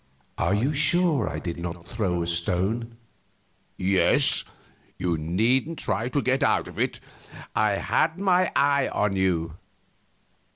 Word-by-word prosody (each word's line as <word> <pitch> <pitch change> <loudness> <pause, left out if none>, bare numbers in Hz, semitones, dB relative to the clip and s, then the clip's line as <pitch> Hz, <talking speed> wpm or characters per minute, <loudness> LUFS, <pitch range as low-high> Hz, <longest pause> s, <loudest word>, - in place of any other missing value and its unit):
"Are 85 +4 +1
you 130 +8 0
sure 155 - +2
I - - -5
did 85 -1 -5
not 85 0 -6
throw 90 -6 -2
a - - -3
stone?" 95 +8 -1 0.8
"Yes. 95 0 +3 0.5
You 90 -2 -1
needn't 115 - 0
try 115 +2 -2
to 140 +2 -1
get 130 +1 +1
out - - +2
of - - -10
it; - - -1 0.6
I 105 -1 +2
had 160 - 0
my 185 -2 +2
eye 140 -1 +3
on 100 -2 -1
you." 85 -4 -1
105 Hz, 135 wpm, -25 LUFS, 90-140 Hz, 0.8 s, Yes